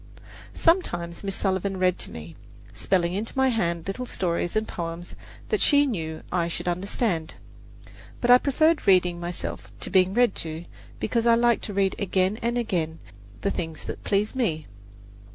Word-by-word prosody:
Sometimes 175 - +1
Miss 195 -1 -2
Sullivan 195 0 -1
read 185 -1 +2
to - - -2
me, 80 +1 -9 0.4
spelling 175 -2 +1
into 215 +7 -4
my 265 0 +4
hand 170 -8 -1
little 245 +6 -4
stories 175 -2 -1
and 215 0 0
poems 170 0 -6 0.4
that 430 - +1
she 285 -1 +5
knew 160 - -4
I 170 -2 +1
should 170 - -4
understand; 175 -1 -1 0.8
but 245 - +3
I 250 - +9
preferred 310 +1 +2
reading 180 -2 +4
myself 175 0 -4
to - - -4
being 190 0 +3
read 245 -3 +4
to, 160 +1 -3 0.3
because 230 +1 0
I 230 - +6
liked 235 0 +2
to 205 - -5
read 195 -1 +2
again 190 +1 +1
and 235 +1 0
again 170 -9 -1 0.4
the 200 - 0
things 160 -3 -4
that - - -7
pleased 205 +4 0
me. 160 - -1
190 Hz, 165 wpm, -25 LUFS, 170-230 Hz, 0.8 s, I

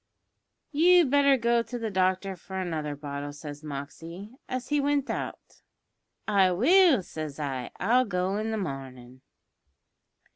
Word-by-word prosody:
"`You'd 340 -1 +5
better 280 -1 +5
go 235 0 +2
to 230 +1 -6
the 225 -2 -3
doctor 190 +1 0
for 190 +2 -8
another 155 -5 -3
bottle,' 145 0 -6
says 145 0 -9
Moxey, 160 - -8 0.2
as 255 0 -4
he 295 -1 +2
wint 285 -1 0
out. - - -6 0.7
"`I 190 -4 +3
will,' 320 - +5
says 155 -3 -7
I; 135 -4 -3
`I'll 245 +7 +3
go 180 +1 0
i' - - -1
the 220 - -2
marnin'.' 130 - -7
185 Hz, 140 wpm, -27 LUFS, -, 0.7 s, `You'd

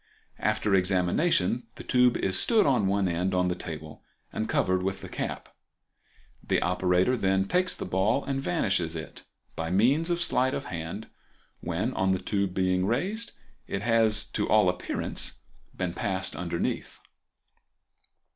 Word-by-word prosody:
After 105 - 0
examination 95 - +2
the - - -9
tube 125 -1 +3
is 95 - -1
stood 225 - +4
on 125 -8 +2
one 100 0 +1
end 90 +2 -1
on 90 0 +2
the 90 - -1
table 80 -3 -8 0.3
and 110 - -3
covered 95 0 +1
with 95 +1 -3
the - - -7
cap. - - -5 0.9
The - - +1
operator 90 +5 +2
then 95 -4 +1
takes 180 - +1
the - - -5
ball 100 +8 +1
and 135 -1 -2
vanishes 95 - 0
it 80 - -7 0.3
by 80 0 -3
means 130 - +3
of 175 0 0
sleight 130 -6 +1
of 140 - -4
hand, 85 - -6 0.5
when, 95 +9 -2
on 95 -3 +1
the 95 - -1
tube 100 0 -1
being 90 -1 +1
raised, 195 - -1 0.3
it 100 - -3
has 110 -2 +4
to - - -1
all 105 -4 +5
appearance 90 0 -2 0.4
been 90 -2 -2
passed 95 +1 0
underneath. 85 -1 -3
95 Hz, 150 wpm, -27 LUFS, 90-120 Hz, 0.9 s, all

